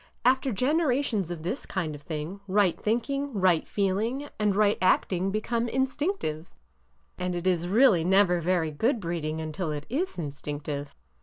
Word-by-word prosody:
After 260 +1 +3
generations 255 - +1
of 170 -3 -6
this 210 +11 -3
kind 170 -6 -2
of 145 - -9
thing, 155 +5 -5
right 195 -2 +3
thinking, 255 +2 -1
right 180 -3 +3
feeling, 220 +8 -1
and 210 -2 +2
right 210 0 +3
act 185 +1 +3
ing 185 +2 0
become 230 +3 -1
instinctive,— 265 - -1 0.7
and 180 0 -2
it 175 +1 -4
is 175 -2 +1
really 210 -3 +5
never 180 -1 +4
very 170 -2 +1
good 230 - +1
breeding 165 -4 -3
until 160 +1 -3
it 150 0 -4
is 330 - -2
instinctive." 145 -2 -5
190 Hz, 155 wpm, -27 LUFS, 165-235 Hz, 0.7 s, really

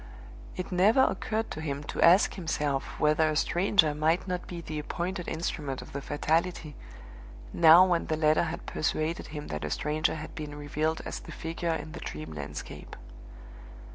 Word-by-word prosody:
It - - -5
never 205 +9 +5
occurred 220 +1 -1
to 155 - -5
him 145 -2 -3
to - - -4
ask 180 +4 +6
himself 150 -6 -2
whether 155 +1 +3
a 155 - -1
stranger 175 -1 +3
might 160 +5 +1
not 180 -1 -3
be 175 - -6
the 155 -2 -5
appointed 175 +4 -4
instrument 150 -4 -3
of - - -10
the 140 - -4
Fatality, 155 +1 -1 0.8
now 165 +3 +8
when 175 -2 0
the 155 - 0
letter 155 +1 +3
had 170 0 -5
persuaded 155 +2 -2
him 150 -1 -7
that 75 -1 -4
a 75 - -2
stranger 155 - 0
had 155 0 -7
been 150 -3 -6
revealed 150 +2 -2
as - - -4
the - - -11
figure 165 0 -3
in 155 - -6
the - - -8
dream 75 +1 -7
landscape. 75 0 -7
155 Hz, 170 wpm, -29 LUFS, 150-175 Hz, 0.8 s, now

